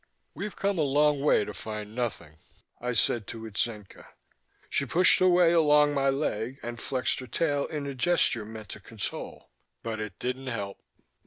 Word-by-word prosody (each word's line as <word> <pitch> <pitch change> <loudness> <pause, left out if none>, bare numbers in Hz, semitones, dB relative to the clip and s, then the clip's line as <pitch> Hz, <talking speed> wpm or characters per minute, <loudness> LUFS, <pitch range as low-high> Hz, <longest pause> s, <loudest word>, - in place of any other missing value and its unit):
"We've 200 +6 -5
come 200 -2 0
a - - +3
long 145 0 +3
way 140 -7 +3
to 105 - -6
find 105 0 -6
nothing," 110 -10 -4 0.4
I 125 +1 -2
said 115 -1 +1
to 115 -1 -7
Itzenca. 105 -1 -4 0.6
She 140 - -1
pushed 175 +8 +5
her 185 - +5
way 175 -1 +5
along 150 -3 +5
my 135 -1 +2
leg 135 -3 -2
and 120 -1 -6
flexed 130 -2 -1
her 130 - -8
tail 145 +3 0
in 150 -2 -4
a 140 - -4
gesture 130 -5 +2
meant 110 0 -9
to - - -8
console. 105 +1 -6 0.3
But 115 -1 -3
it 105 -5 -6
didn't 130 +4 -4
help. 100 -5 -4
125 Hz, 175 wpm, -28 LUFS, 110-150 Hz, 0.6 s, pushed